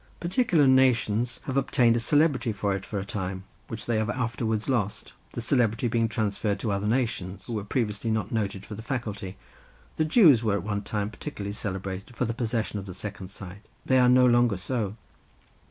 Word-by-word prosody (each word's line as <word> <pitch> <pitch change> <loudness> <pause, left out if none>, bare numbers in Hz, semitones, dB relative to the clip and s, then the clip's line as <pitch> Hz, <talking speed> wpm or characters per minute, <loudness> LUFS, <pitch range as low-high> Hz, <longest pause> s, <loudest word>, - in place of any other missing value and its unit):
Particular 175 - +2
nations 125 -3 +3
have 135 - -4
obtained 125 -3 +3
a - - +2
celebrity 145 -1 +2
for 100 -1 -1
it 95 0 -5
for 105 - -4
a 95 - -3
time, 95 -2 -4 0.2
which 110 -1 -6
they 115 -2 0
have 110 +1 -1
afterwards 115 -1 -1
lost, 105 - -1 0.2
the - - -4
celebrity 120 -1 +2
being 115 -1 +1
transferred 105 -2 -1
to 110 - -1
other 100 +1 -1
nations, 110 -6 -1
who 120 - -5
were 105 -2 -2
previously 105 0 -2
not 110 -2 -1
noted 100 -3 -2
for - - -8
the 105 - -7
faculty. 105 -7 -4 0.6
The 155 - +2
Jews 155 - +6
were 105 -3 +2
at 100 - -2
one 100 0 -2
time 105 0 -3
particularly 100 -7 -6
celebrated 95 +2 -5
for 125 - 0
the 115 - -2
possession 115 -3 -2
of 100 - -8
the 90 - -7
second 100 -2 -7
sight; 100 0 -10 0.2
they 130 -1 +4
are 125 -1 +5
no 125 0 +6
longer 120 -4 +4
so. 105 0 -2
110 Hz, 195 wpm, -27 LUFS, 100-125 Hz, 0.6 s, Jews